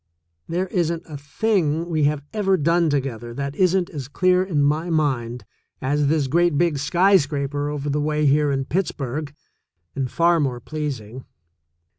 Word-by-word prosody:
There 180 +3 0
isn't 170 -2 -1
a 155 - -9
thing 160 +2 0
we 155 -4 +1
have 145 -1 0
ever 195 -3 +2
done 165 +1 +2
together 120 -5 -3
that 140 +1 -4
isn't 185 0 +2
as 140 -5 -6
clear 180 +5 +2
in 160 -7 0
my 155 +4 +1
mind 130 -7 -1 0.3
as 145 +2 0
this 150 -1 +2
great 170 +3 +2
big 165 -3 +1
skyscraper 145 -4 +2
over 145 -1 -4
the 145 +1 0
way 150 0 0
here 145 +1 +3
in 135 -1 -1
Pittsburgh, 150 -4 -3 0.6
md 135 -2 -2
far 170 +3 +3
more 130 -5 -1
pleasing. 130 -4 -5
150 Hz, 155 wpm, -22 LUFS, 140-170 Hz, 0.6 s, here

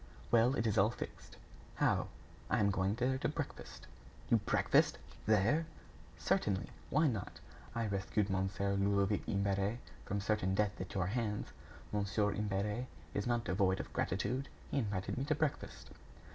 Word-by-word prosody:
"Well, 120 +3 +5
it 115 - 0
is 110 -4 +2
all 100 +3 +5
fixed." 120 - -8 0.4
"How?" - - +2 0.4
"I - - +2
am 100 -1 +4
going 95 +1 +1
there 130 +2 +1
to - - 0
breakfast." - - -6 0.4
"You - - +6
breakfast - - +3 0.3
there!" 110 +10 +3 0.5
"Certainly. 100 -2 0 0.2
Why 155 +3 +3
not? 115 -10 -2 0.4
I 115 0 0
rescued 100 0 0
Mon. 95 -1 0
Ludovic 100 +1 +2
Imbert 100 +2 +1 0.3
from 100 - -2
certain 100 -2 +1
death 105 -1 0
at 95 - -6
your 95 -2 +1
hands. 105 0 -1 0.4
Mon. 105 -1 +1 0.3
Imbert 105 +3 -1 0.3
is 100 - -1
not 120 -1 +1
devoid 95 -1 +2
of - - -6
gratitude. 125 +9 -1 0.2
He - - +2
invited 100 -2 -2
me 135 - -1
to 155 - +1
breakfast." 150 -1 -3
105 Hz, 150 wpm, -35 LUFS, 100-115 Hz, 0.5 s, You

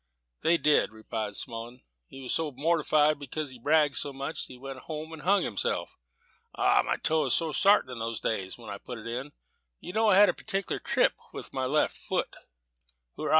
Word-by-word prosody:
"They 170 +1 +4
said," 150 -7 +3
replied 110 -1 -4
Smullen, 120 +1 -6 0.2
"he 135 - -11
was 130 - -1
so 160 -2 +1
mortified 155 +1 +2
because 145 +1 -4
he'd 125 -2 -13
bragged 150 -1 +3
so 145 - -2
much, 140 +3 -4
that - - -10
he - - -12
went 135 +1 -8
home 155 +3 -6
and 160 - -8
hung 195 +3 +3
himself. 105 - -2 0.6
Ah, - - +4
my - - -1
toe 160 0 +1
was - - +3
so 165 -2 +1
sartin 200 -7 +4
in 125 - -6
those 115 0 -3
days, 95 -4 -2
when 115 -3 -9
I 100 - -6
put 125 - -8
it 110 - -10
in! 125 +5 -4 0.5
You 180 - -8
know 220 +1 +3
I 190 - +6
had 205 +1 +8
a - - +2
particular 195 -3 -3
trip - - +2 0.2
with - - -8
my 130 -1 -1
left 150 +3 +2
foot." - - -2 0.8
"Hoora!" 155 - -3
145 Hz, 205 wpm, -28 LUFS, 120-160 Hz, 0.8 s, had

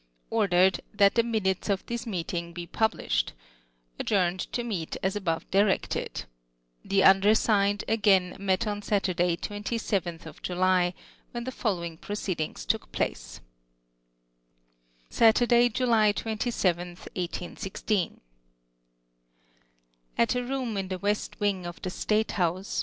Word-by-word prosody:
Ordered, 190 -4 +3
That 200 -1 +5
the 230 - +4
minutes 215 -5 -1
of 195 -1 0
this 235 0 -4
meeting 170 -3 -3
be 175 0 -6
publislied. 220 +5 0 0.7
Adjourned 185 -3 +1
to 240 - -2
meet 195 -9 -3
as 190 +2 0
above 170 -5 -2
directed. 195 0 +1 0.6
Tlie 195 -1 +3
undersigned, 200 +1 +4
again 195 -5 +3
met 195 +3 +1
on 205 -1 -2
Saturdaj', 185 -4 0
27th 200 -7 -3
July, 180 0 +2 0.4
when 240 -1 -4
the 260 - -4
following 175 -9 -2
proceedings 185 -5 -4
took - - -1
place: - - -3 0.8
— - - -41
Satvrday, 240 +1 +5
July 220 -3 +3
27tli, 185 -6 -1 0.2
1816. 180 +2 -3 2.0
At 235 - +3
a 250 0 -1
room 250 -4 -2
in 195 -1 -2
the 185 0 -3
west 205 +2 -2
wing 195 -4 0
of 175 - -8
the 185 - -2
state 215 +3 0
house. 185 +1 -1
195 Hz, 120 wpm, -27 LUFS, 175-215 Hz, 2.0 s, That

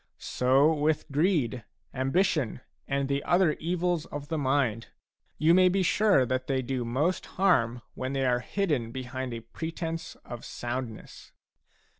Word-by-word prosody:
So 135 +5 +3
with 150 0 0
greed, 140 - +1 0.3
ambition, 135 - 0 0.3
and 140 0 0
the 140 0 -1
other 175 -3 +3
evils 175 0 -1
of 145 0 -7
the 160 - -1
mind, 130 -5 0 0.3
— - - -57
you 160 +2 +4
may 185 0 +6
be 190 +1 +1
sure 195 -6 +4
that 130 +1 -2
they 130 -1 0
do 130 0 -2
mosfharm 130 -1 +1
when 130 +1 -4
they 135 -1 0
are 125 -1 +2
hidden 145 - -1
behind 130 0 -5
a 115 -1 -5
pretence 165 +6 -5
of 120 -1 -8
soundness. 120 -2 -6
140 Hz, 145 wpm, -28 LUFS, 125-165 Hz, 0.3 s, may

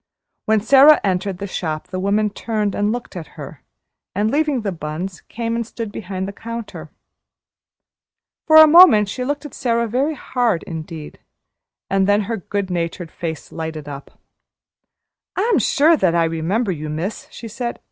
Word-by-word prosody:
When 220 -1 +3
Sara 275 +6 +7
entered 190 0 -1
the 200 - -5
shop 160 -5 -4
the 185 - -4
woman 205 +2 +1
turned 210 -1 -2
and 205 +1 0
looked 240 -3 -6
at 165 -4 -9
her - - -9 0.5
and, 210 +3 +1
leaving 295 -3 +1
the 205 -2 -2
buns, 170 +3 -6
came 230 0 -3
and 235 - -1
stood 225 -1 -7
behind 190 -2 -5
the 200 - -6
counter. 230 +2 -8 1.6
For 315 - +5
a 315 0 +11
moment 305 - +7
she 250 - -4
looked 290 +3 -3
at 295 - -9
Sara 235 -2 0
very 270 +7 0
hard 245 -8 -1
indeed, 160 -2 -8 0.7
and 195 0 +1
then 205 +1 +3
her 225 +3 -3
good 200 0 -4
natured 170 -1 -3
face 160 -2 -6
lighted 160 -2 -6
up. 140 -1 -10 1.2
"I'm 445 +5 +2
that - - +2
sure 315 +3 +4
I 170 -2 +3
remember 165 +7 -1
you, 155 -3 -5
miss," 170 +8 -4
she 230 - -9
said. 235 +2 -5
205 Hz, 165 wpm, -20 LUFS, 175-235 Hz, 1.6 s, a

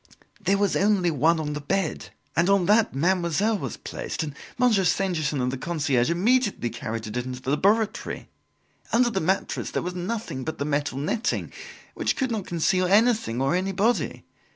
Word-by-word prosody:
"There 200 - +3
was 200 0 +1
only 195 -4 +3
one 160 +3 +3
on 150 -1 -3
the 150 - -4
bed, 195 +7 -2 0.3
and 170 +3 +3
on 200 -2 +4
that 210 -4 +3
Mademoiselle 185 +6 +1
was - - -5
placed; - - -5
and 150 -2 -5 0.2
Monsieur 235 -6 +3
Stangerson 165 -5 0
and 125 0 0
the 135 - -5
concierge 145 -6 0
immediately 205 - +1
carried 115 +1 -5
it 105 +3 -5
into 125 +1 -4
the 130 +1 -3
laboratory. 205 +8 +1 0.6
Under 240 +1 +3
the 190 - -1
mattress 190 +5 -1
there - - -2
was 180 +1 -3
nothing 180 - -4
but 160 +3 -4
the 140 - -2
metal 145 -2 -1
netting, 210 - -1 0.4
which - - 0
could 260 -3 -1
not 215 -4 -3
conceal 180 +2 +1
anything 215 - +3
or 135 +3 +1
anybody. 195 +5 0
180 Hz, 175 wpm, -25 LUFS, 145-205 Hz, 0.6 s, on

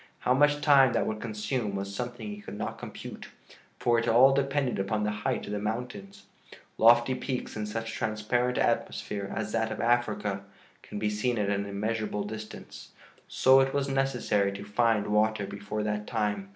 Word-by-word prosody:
How 125 - +3
much 145 +2 +3
time 140 -4 +6
that - - +1
would 110 0 -3
consume 105 -1 -2
was 100 0 -4
something 120 - -5
he 205 0 -7
could 150 - -8
not - - -4
compute - - -8 0.5
for 120 -1 +2
it 115 - -2
all 130 +4 +6
depended 135 -3 0
upon 105 +2 -1
the 105 - 0
height 105 0 -2
of - - -7
the 105 - -2
mountains. 105 -2 -5 0.6
Lofty 120 +2 +6
peaks 130 0 -4
in 105 -1 -3
such 115 +1 -4
transparent 110 +3 -1
atmosphere 100 -1 -1
as 105 -1 -3
that 115 0 0
of 110 - -5
Africa 110 -5 0 0.4
can - - -8
be 105 0 0
seen 115 +3 0
at 100 -1 0
an 100 0 -1
immeasurable 105 +1 -2
distance; 110 +1 -9 0.3
so 130 +1 +5
it 135 +1 +1
was 140 -1 0
necessary 125 -7 +1
to 100 - -7
find 110 0 +2
water 105 0 +1
before 100 +2 -4
that 105 0 -2
time. 105 -3 -1
110 Hz, 180 wpm, -28 LUFS, 105-125 Hz, 0.6 s, time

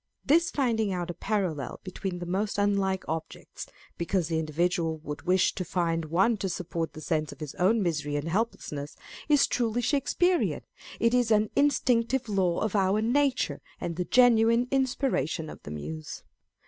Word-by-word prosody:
This 335 +4 +4
finding 225 -7 0
out 175 -1 -2
a - - -7
parallel 180 - -2
between 185 -1 -5
the 175 - -5
most 195 +4 -1
unlike 200 -2 +1
objects, 160 0 -6 0.3
because 170 0 0
the 160 -1 0
individual 160 +1 0
would 150 +2 -7
wish 185 0 +3
to 185 - -3
find 165 -2 -1
one 190 +8 +2
to 195 -1 -2
support 170 -2 -3
the 155 - -9
sense 155 -2 -1
of - - -12
his 150 -3 -6
own 205 +4 +3
misery 150 -4 -1
and 145 +2 -2
helpless 220 +7 -2
ness, 145 0 -6 0.3
is 290 -2 +5
truly 240 0 -1
Shakespearian; 335 +7 +1 0.4
it 230 +1 +2
is 245 -2 +3
an 215 -1 +3
instinctive 260 -3 +2
law 190 -4 +1
of 220 -1 -1
our 195 +1 +2
nature, 245 - +1 0.2
and 170 - -4
the 180 +1 -2
genuine 235 0 +4
inspiration 250 - 0
of - - -12
the - - -9
Muse. 75 +1 -6
190 Hz, 170 wpm, -28 LUFS, 165-230 Hz, 0.4 s, is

